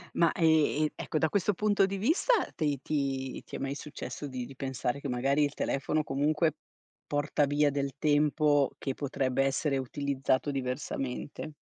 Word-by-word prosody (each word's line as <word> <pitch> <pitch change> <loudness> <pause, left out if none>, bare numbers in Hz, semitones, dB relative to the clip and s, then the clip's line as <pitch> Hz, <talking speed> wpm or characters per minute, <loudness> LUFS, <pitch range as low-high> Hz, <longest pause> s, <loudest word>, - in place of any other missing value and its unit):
Ma, 170 -1 +4
ehm, 155 -2 +3
ecco, 155 - -3
da 160 0 +2
questo 205 0 +1
punto 205 0 +3
di 195 0 -3
vista 320 - +2 0.2
te 145 -4 0
ti 135 -3 -2
ti - - -8
è - - -4
mai 135 +1 -2
successo 145 0 -6
di 130 -2 -5
di 135 - -11
pensare 130 -1 -2
che 140 - -5
magari 135 +4 +2
il 145 0 0
telefono 150 +3 0
comunque 150 +3 +1 0.5
porta 145 0 +1
via 145 +1 +3
del 140 -1 -2
tempo 150 -1 +3
che 135 - -3
potrebbe 135 -1 0
essere 135 +1 +1
utilizzato 135 +1 -1
diversamente? 135 +2 -4
145 Hz, 160 wpm, -30 LUFS, 135-155 Hz, 0.5 s, Ma